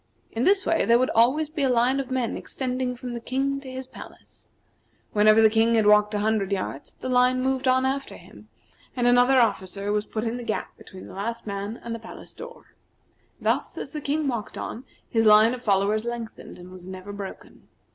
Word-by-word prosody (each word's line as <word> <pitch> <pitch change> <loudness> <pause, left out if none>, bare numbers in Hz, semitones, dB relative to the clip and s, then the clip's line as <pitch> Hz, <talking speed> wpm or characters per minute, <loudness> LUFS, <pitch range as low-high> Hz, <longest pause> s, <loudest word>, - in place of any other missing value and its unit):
In 230 +3 -1
this 390 0 +3
way 330 - +2
there 235 +1 +4
would 255 +2 +1
always 260 +7 +3
be 305 0 -5
a 270 - +2
line 250 +2 +2
of 270 -1 -4
men 255 -3 -1
extending 255 -1 -3
from 245 0 -6
the 235 - -4
King 270 +3 -1
to 275 -1 -10
his 260 0 -6
palace. 260 - -14 0.6
Whenever 215 +1 +5
the - - +9
King 225 +1 +3
had 220 -2 +3
walked 210 0 +4
a 205 - 0
hundred 215 -2 0
yards 185 -7 -4
the - - -7
line 250 0 +3
moved 265 0 -1
on 260 0 +3
after 275 +1 -3
him, - - -16 0.5
and 245 -2 0
another 245 +2 +5
officer 200 -3 0
was 210 0 -1
put 215 - -4
in 235 +1 -2
the 245 - -6
gap 220 - -4
between 190 -1 -12
the - - -11
last 230 +4 -4
man 200 +2 -5
and 235 - -4
the 230 - -5
palace 225 - -12
door. 480 0 -12 0.7
Thus, - - -1
as - - -6
the 300 - -5
King 295 +1 -1
walked 235 -5 -4
on, 245 +4 -6 0.2
his 225 -1 +2
line 215 +2 +7
of 250 - -6
followers 205 0 +1
lengthened, 235 -1 -7
and 180 +1 -12
was 185 -1 -12
never 190 +2 -8
broken. 200 -1 -9
235 Hz, 210 wpm, -25 LUFS, 210-260 Hz, 0.7 s, the